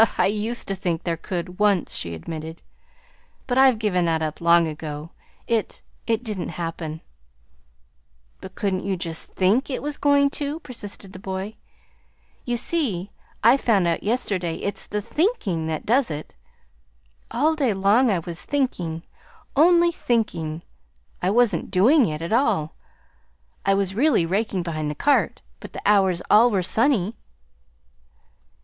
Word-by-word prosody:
"I - - +4
used 215 +4 -1
to 195 - -1
think 175 -3 -2
there 170 -1 -1
could 180 +2 -5
once," 205 -4 +2
she 85 -1 -4
admitted; 160 - -7 0.8
"but 255 0 +1
I've 265 -3 +6
given 190 -5 +1
that 160 -1 +1
up 155 +1 -4
long 170 0 +5
ago. 155 +1 -6 0.3
It 230 -3 -2 0.2
it 230 0 0
didn't 210 -6 -4
happen." 165 -2 -5 1.4
"But - - -11
couldn't 190 -2 -1
you 195 -1 -1
just 165 -2 -5
THINK 205 +10 +2
it 265 - -3
was 295 0 -3
going 285 -1 +3
to?" 290 +2 -3
persisted 205 - -8
the 185 - -9
boy. 190 +2 -5 0.9
"You 240 -1 0
see 225 - -1 0.3
I 235 +5 +7
found 210 -9 +2
out 170 - 0
yesterday 200 -7 -1
that - - -2
it's - - -7
the 210 0 -2
THINKING 230 - 0
that 160 -1 -3
does 245 +3 +2
it. 150 -1 -6 1.0
All 300 +6 +2
day 275 -7 +1
long 205 +6 +3
I 195 - +2
was 170 0 -6
thinking 175 - -2 0.5
only 340 +3 +5
thinking. 170 - -1 0.6
I 180 - +1
wasn't 235 +1 +2
DOING 240 +9 +5
it, 155 0 -4
at 170 - -2
all. 215 - +1 0.9
I 195 - +5
was 195 -1 0
really 240 - +3
raking 195 +1 -1
behind 155 -3 -3
the 150 - -4
cart; 285 - +1 0.2
but - - -11
the - - -6
hours 190 -4 +3
all 225 +4 +7
were 195 -5 0
sunny." 225 0 +1
195 Hz, 150 wpm, -23 LUFS, 170-240 Hz, 1.4 s, I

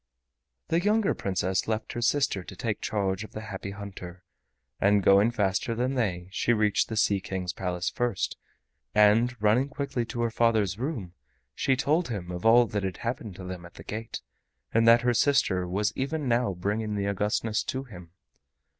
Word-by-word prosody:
The 165 - +3
younger 210 +2 +2
Princess 95 -1 -1
left 110 0 -2
her 120 - -4
sister 125 -7 +1
to 95 - -10
take 110 +1 -3
charge 100 -1 -1
of 110 - -11
the 110 - -5
Happy 110 -2 -6
Hunter, 95 -3 -9 0.6
and 100 0 +3
going 100 +4 +6
faster 110 +1 0
than 125 +3 0
they, 95 -9 -1
she 120 - +1
reached 105 -2 +2
the 110 - -3
Sea 105 -2 +3
King's 90 -2 -4
Palace 90 -1 -3
first, 120 -5 -1 0.6
and 115 +4 +4
running 110 +6 +3
quickly 140 -4 -2
to 120 +1 -4
her 115 - 0
father's 110 -4 +1
room, 120 - -4 0.4
she 135 - +1
told 155 +6 +1
him 95 -6 -5
of 90 +5 -1
all 120 +2 +7
that 105 -2 -2
had 95 -2 -3
happened 115 -4 -4
to 95 - -9
them 90 -1 -6
at 85 - -13
the - - -11
gate, 110 +1 -6 0.5
and 115 0 +4
that 115 +1 +7
her 120 0 +2
sister 105 -9 +2
was 100 +4 0
even 140 +2 -2
now 120 -5 +1
bringing 105 +4 -2
the 100 -1 -1
Augustness 105 +2 0
to 130 +1 -3
him. 90 -9 -12
105 Hz, 180 wpm, -27 LUFS, 95-120 Hz, 0.6 s, all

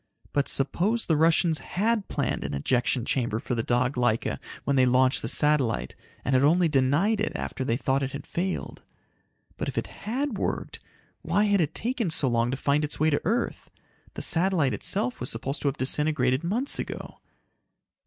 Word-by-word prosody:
But 140 -1 +1
suppose 200 - +1
the 160 - +2
Russians 160 0 +3
had 215 +8 -1
planned 140 -4 -2
an - - -3
ejection 120 - 0
chamber 120 -5 0
for 115 - -4
the 115 - 0
dog 125 +3 +1
Laika 120 -2 0 0.2
when 140 - 0
they 130 -1 +4
launched 130 +1 +3
the - - -3
satellite 140 -3 +2 0.3
and 130 - 0
had 130 +1 +4
only 170 +4 +4
denied 155 +10 +2
it 220 - 0
after 130 - -4
they 120 -2 0
thought 135 +1 0
it 135 - -1
had 140 - -7
failed? 185 +2 -3 0.8
But - - -3
if - - -7
it - - 0
had 250 -1 -4
worked, - - -3 0.4
why 205 - +1
had 205 -3 +3
it 155 0 -1
taken 235 -4 -1
so 155 -3 +3
long 120 -1 +1
to 130 - -2
find 145 +2 +1
its 150 - -3
way 155 +1 +3
to 145 - +1
earth? 235 +2 -1 0.5
The - - -3
satellite 165 - +2
itself 120 +4 -1
was 125 - -3
supposed 135 +6 -4
to - - -1
have 140 +2 -1
disintegrated 130 0 +1
months 235 +11 0
ago. - - -6
145 Hz, 185 wpm, -26 LUFS, 130-180 Hz, 0.8 s, they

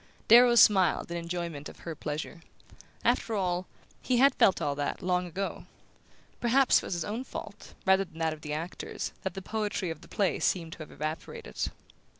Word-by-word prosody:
Darrow 240 +1 +8
smiled 190 -7 +5
in 170 - -2
enjoyment 170 -3 -4
of - - -14
her 165 - -5
pleasure. 155 +3 -5 0.6
After 225 - +2
all, 180 -2 -1 0.3
he 250 - +1
had 275 +3 +6
felt 190 - +4
all 145 - 0
that, 145 +6 -3
long 180 0 +1
ago; 190 +3 -4 0.7
perhaps 255 +3 +4
it - - -1
was - - -3
his 170 - -2
own 225 +5 -3
fault, - - -9
rather 190 +1 +4
than 160 - -17
that 160 -1 0
of 155 - -11
the 150 - -6
actors, 160 +4 -4
that 190 -2 -4
the 195 - -6
poetry 210 -4 -2
of 160 -1 -8
the - - -14
play 195 -3 0
seemed 165 -3 0
to - - -12
have 155 - -8
evaporated... 155 - -4
180 Hz, 185 wpm, -29 LUFS, 160-205 Hz, 0.7 s, Darrow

